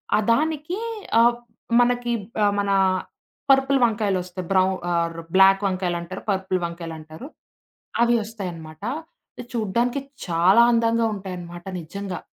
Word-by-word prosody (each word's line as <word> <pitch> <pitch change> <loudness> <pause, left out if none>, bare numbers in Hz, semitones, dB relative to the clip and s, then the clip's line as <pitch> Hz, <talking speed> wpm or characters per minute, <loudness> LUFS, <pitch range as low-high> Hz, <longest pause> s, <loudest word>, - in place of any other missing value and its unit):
ఆహ్, 215 - +2
దానికి 310 +6 0 0.4
ఆహ్, 235 +1 +5 0.5
మనకి 245 0 +1 0.3
ఆహ్, 205 0 +3
మనా 200 -1 +2 0.7
పర్పుల్ 270 0 +4
వంకాయలొస్తయి. 190 -5 -1
బ్రౌ 185 -1 +4 0.3
ఆర్ 170 -1 0 0.2
బ్లాక్ 195 +1 +6
వంకాయలంటారు, 180 -1 -3
పర్పుల్ 190 -1 -1
వంకాయలంటారు, 165 - -8 0.8
అవి 240 0 +3
ఒస్తాయనమాట. 175 -7 -8 0.5
అది 245 - -7
చూడ్డానికి 235 +4 0 0.3
చాలా 175 +6 +5
అందంగా 230 0 +2
ఉంటాయనమాట 175 -3 -8 0.2
నిజంగా. 190 +3 -6
195 Hz, 105 wpm, -23 LUFS, 175-235 Hz, 0.8 s, బ్లాక్